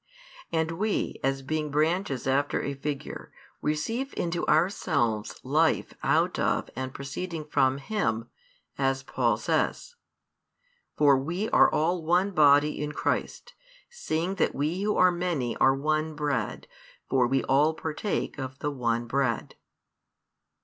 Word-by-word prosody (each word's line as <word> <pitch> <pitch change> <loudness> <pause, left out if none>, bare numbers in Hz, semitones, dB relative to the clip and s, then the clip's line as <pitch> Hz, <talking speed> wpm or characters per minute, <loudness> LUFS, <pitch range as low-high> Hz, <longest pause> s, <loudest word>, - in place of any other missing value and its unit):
And 165 +1 -1
we, 215 0 -1
as 135 0 0
being 155 +2 -2
branches 155 -2 0
after 140 +2 +1
a 140 - -3
figure, 140 +1 -6 0.3
receive 225 - -2
into 170 0 -1
ourselves 145 - +1
life 155 +5 +1
out - - +1
of - - 0
and 130 0 -4
proceeding 155 +4 -5
from 135 -3 +2
Him, 135 - -2 0.5
as 135 -1 +1
Paul 120 -4 +1
says: 485 - -1 1.0
For 140 -3 +5
we 175 +10 -3
are - - +6
all 170 +2 +1
one 180 +5 +2
body 150 -3 +4
in 150 0 -3
Christ, - - -2 0.4
seeing 180 - -2
that - - +2
we 155 +7 -1
who 210 +1 0
are 185 0 +6
many 175 -9 -2
are 135 0 +4
one 155 +2 -1
bread: 145 -7 -2 0.4
for 130 -2 +2
we 135 +1 +1
all 150 +4 +3
partake 160 +1 -3
of 130 0 -5
the 145 - -2
one 120 -3 -1
bread. 120 -2 -1
150 Hz, 135 wpm, -27 LUFS, 135-165 Hz, 1.0 s, are